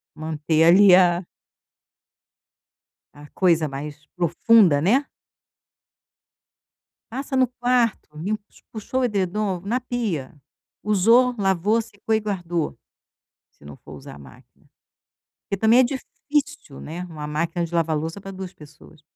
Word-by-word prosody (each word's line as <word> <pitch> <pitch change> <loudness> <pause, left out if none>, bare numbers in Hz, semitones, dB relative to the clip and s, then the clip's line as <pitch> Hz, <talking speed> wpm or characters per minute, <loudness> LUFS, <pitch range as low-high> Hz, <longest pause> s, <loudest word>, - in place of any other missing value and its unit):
manter 155 0 -1
ali 190 +2 +7
a 175 -1 +4 1.9
a 145 0 -13
coisa 165 -5 +2
mais 145 +2 -8
profunda, 175 -1 +4
né. 245 - +2 2.1
Passa 270 +1 -4
no 255 -2 +3
quarto, 245 -2 0
limpa 205 +6 -4
os - - -23
puxou 230 +4 -3
o - - +1
edredom 200 -3 -1
na 240 +5 -1
pia, 220 - -3 0.5
usou, 230 +5 +3
lavou, 200 +3 +1
secou 220 0 -4
e 220 - +2
guardou, 175 -6 -3 0.7
se - - -23
não 70 -1 -11
for - - -15
usar - - -11
a - - -13
máquina. 65 -3 -18 0.8
Porque 195 - -5
também 225 +3 +5
é - - +7
difícil, 285 - -4
né, 170 +4 -7
uma 155 -4 -8
máquina 165 +3 -2
de 170 +1 -7
lavar 160 -2 +1
louça 165 +6 -5
para 195 - -8
2 190 -1 -8
pessoas. 150 +1 -17
185 Hz, 130 wpm, -22 LUFS, 160-225 Hz, 2.1 s, ali